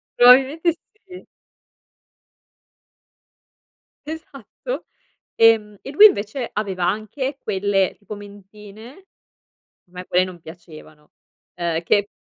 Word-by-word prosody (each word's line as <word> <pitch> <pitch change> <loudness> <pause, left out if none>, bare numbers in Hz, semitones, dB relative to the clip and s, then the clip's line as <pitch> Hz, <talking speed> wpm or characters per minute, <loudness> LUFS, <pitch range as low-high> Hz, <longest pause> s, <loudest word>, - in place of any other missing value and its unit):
probabilmente 270 +7 +5 0.3
sì. 365 -1 -13 2.8
Esatto. 315 - -8 0.5
Ehm, 220 -2 +3
e - - -8
lui 365 +9 +8
invece 235 - -1
aveva 190 -4 -2
anche 240 +8 -3
quelle 195 -3 -1
tipo 210 0 -9
mentine, 205 - -14 0.9
me 180 0 -9
poi 180 0 +2
non 185 -2 -8
piacevano, 155 -2 -15 0.4
ehm, 170 -1 -2
che 200 +4 +1
210 Hz, 90 wpm, -21 LUFS, 185-265 Hz, 2.8 s, lui